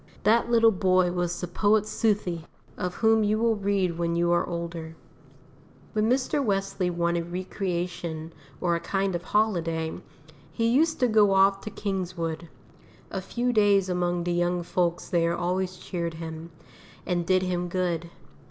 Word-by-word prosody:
That 230 +4 +3
little 230 -1 +5
boy 185 -2 +2
was 175 -1 -2
the 180 - -3
poet 205 +4 +2
Southey, 200 -6 -1 0.3
of 180 -1 -3
whom 220 -1 +3
you 210 +1 +2
will 230 0 +2
read 195 -4 0
when 170 0 0
you 170 0 +2
are 175 - +1
older. 170 -1 -5 1.0
When 215 +1 +1
Mr. 265 +3 +1
Wesley 195 -4 0
wanted 170 0 -1
recreation 175 -3 -4 0.3
or 175 -1 +1
a - - -1
kind 195 +2 -1
of 175 - -2
holiday, 165 -7 0 0.6
he 230 +8 -1
used 310 +7 +2
to 250 - +5
go 210 -3 +4
off 195 0 +4
to - - -6
Kingswood. 175 -5 -4 0.6
A 190 - -3
few 245 +5 -1
days 200 -3 +4
among 175 -1 0
the 175 0 -1
young 175 0 0
folks 175 0 -1
there 170 -1 +1
always 180 +1 -1
cheered 170 -2 -4
him, 160 0 -7 0.6
and 175 -2 0
did 185 +2 +2
him 180 -1 -1
good. 175 -2 -2
180 Hz, 155 wpm, -26 LUFS, 170-205 Hz, 1.0 s, little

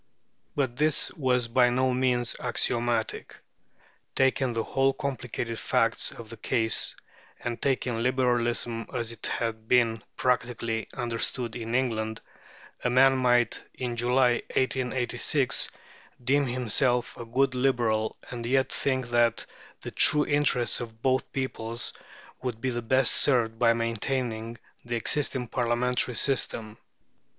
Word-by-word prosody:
But 130 -4 -1
this 155 +1 +1
was 125 -6 +1
by 125 +1 +4
no 130 +1 +1
means 125 -2 +1
axiomatic. 120 -2 -1 0.8
Taking 130 -1 +2
the 115 -1 -1
whole 135 0 +1
complicated 125 -5 -4
facts 115 0 +1
of 115 - -10
the 115 - -9
case, 110 +1 +1 0.4
and 120 -1 -5
taking 125 -4 0
Liberalism 120 -2 0
as 120 -2 -2
it 115 -1 -5
had 110 -1 -3
been 115 -3 +3 0.2
practically 115 -3 -1
understood 120 0 -2
in 115 0 -4
England, 110 -4 -1 0.6
a 125 - +1
man 135 +2 +5
might 120 -2 +2
in 125 -2 -3
July, 125 0 +2
1886, 130 +1 +1 0.5
deem 140 +2 +2
himself 125 0 0
a - - -7
good 130 +3 +1
Liberal 120 -4 0
and 120 -2 -5
yet 130 +1 +1
think 130 -3 -1
that 120 -1 +2 0.4
the - - -7
true 150 -1 +5
interests 145 -5 +1
of 115 -1 -9
both 130 0 +1
peoples 120 -3 -3 0.5
would 125 -3 -4
be 130 +2 -1
best 130 +2 +4
served 115 -5 +4
by 120 -1 +5
maintaining 115 0 -2 0.3
the 120 0 -3
existing 130 +1 -1
Parliamentary 125 +1 0
system. 115 -5 0
120 Hz, 125 wpm, -27 LUFS, 115-130 Hz, 0.8 s, man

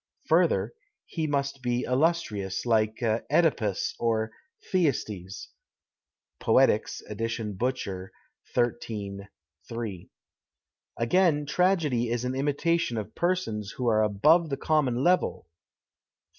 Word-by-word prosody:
Further, - - +3 0.3
he 160 -2 -3
must 140 -2 -1
be 125 0 0
illustrious, 125 - 0
like 110 -2 +2
CEdipus 115 - +1
or 110 -1 0 0.4
Thyestes 110 - -1 0.9
(Poetics, - - +2
ed. 105 +1 -7 0.4
Butcher, 100 -7 -3 0.4
XIII. 105 -5 -2 0.4
3). 110 -7 -5 0.9
Again, 150 +4 +2
tragedy 150 -9 +1
is 120 +1 -1
an 125 - -1
imitation 145 0 0
of 105 - -5
persons 170 - -1
who 125 - -2
are 110 -1 +3
above 150 - +4
the 135 - -2
common 135 -5 +1
level 180 - +2
(XV. 85 - -64
120 Hz, 105 wpm, -27 LUFS, 110-150 Hz, 0.9 s, above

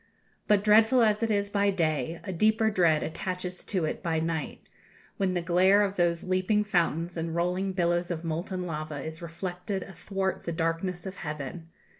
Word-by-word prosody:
But 205 -1 +4
dreadful 220 +4 +5
as 215 -1 +2
it 230 - +1
is 200 -1 0
by 200 0 +2
day, 165 -4 0
a 190 - -4
deeper 220 +4 +3
dread 170 -6 +3
attaches 180 +2 -4
to 185 -6 0
it 155 - -3
by 165 -3 0
night, 160 -1 -3 0.5
when 190 -2 +1
the 175 -1 -1
glare 185 +4 +5
of 200 -1 -1
those 170 -2 +1
leaping 185 +3 +1
fountains 175 -3 0
and 165 0 -3
rolling 180 +3 0
billows 175 -1 +1
of 170 -2 -3
molten 180 +3 -3
lava 155 -3 -4
is 160 +1 -7
reflected 180 +3 -4
athwart 190 +1 -3
the 170 - -2
darkness 165 +2 -2
of 190 0 -6
heaven. 155 +2 -6
180 Hz, 175 wpm, -28 LUFS, 165-195 Hz, 0.5 s, dreadful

